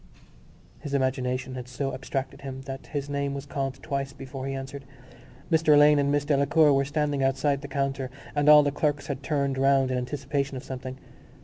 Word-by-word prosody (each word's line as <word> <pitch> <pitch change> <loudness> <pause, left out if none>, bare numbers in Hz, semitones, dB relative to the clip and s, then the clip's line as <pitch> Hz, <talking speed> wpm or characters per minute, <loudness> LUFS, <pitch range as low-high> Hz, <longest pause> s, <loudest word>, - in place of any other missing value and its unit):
His 145 -2 -4
imagination 130 -1 -1
had 125 -1 -6
so 135 +2 -3
abstracted 130 +1 -4
him 135 -1 -6
that 135 0 -8
his 145 -2 -4
name 140 -1 -2
was 140 0 -6
called 135 -2 -3
twice 140 -1 -3
before 135 0 -7
he 135 - -3
answered. 135 +1 -6 0.7
Mr 160 -2 +5
Alleyne 145 0 +6
and 140 0 +2
Miss 145 0 +1
Delacour 145 +1 +4
were 135 0 +2
standing 145 -1 0
outside 140 +1 +1
the 140 - -7
counter 135 -1 -2 0.2
and 145 0 +3
all 150 0 +9
the 145 - +1
clerks 145 0 -1
had 140 -2 -4
turned 140 -2 -1
round 135 -1 +3
in 125 - 0
anticipation 140 +1 -2
of 130 - -7
something. 130 -1 -6
140 Hz, 190 wpm, -27 LUFS, 135-145 Hz, 0.7 s, all